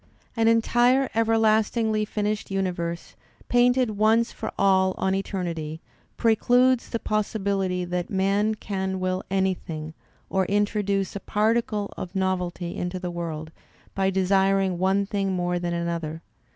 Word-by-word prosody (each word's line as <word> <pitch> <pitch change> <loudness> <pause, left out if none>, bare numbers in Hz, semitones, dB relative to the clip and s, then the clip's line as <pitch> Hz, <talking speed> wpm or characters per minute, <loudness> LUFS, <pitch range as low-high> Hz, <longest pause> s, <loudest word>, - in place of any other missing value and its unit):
An 225 -1 +2
entire 240 +3 +3
everlastingly 220 -1 +2
finished 210 0 -2
universe, 175 -3 -3 0.3
painted 245 -1 +3
once 225 +2 +3
for - - -5
all 190 -1 +3
on 190 - 0
eternity, 170 -5 -3 0.4
precludes 245 +2 +3
the 230 - -1
possibility 200 -4 -1
that 175 0 -3
man 200 +3 +1
can 190 -2 -3
will 185 0 -1
anything 180 -5 -2 0.3
or 190 -1 +1
introduce 205 -1 0
a - - -3
particle 215 +1 0
of 185 +1 -7
novelty 180 -2 -2
into 180 +1 -3
the 180 -1 -4
worlds 160 -2 -5 0.4
by 195 0 +1
desiring 190 -1 +2
one 190 +2 +2
thing 195 -1 -1
more 175 -1 -1
than 175 0 -2
another. 170 -2 -3
195 Hz, 125 wpm, -25 LUFS, 180-215 Hz, 0.4 s, entire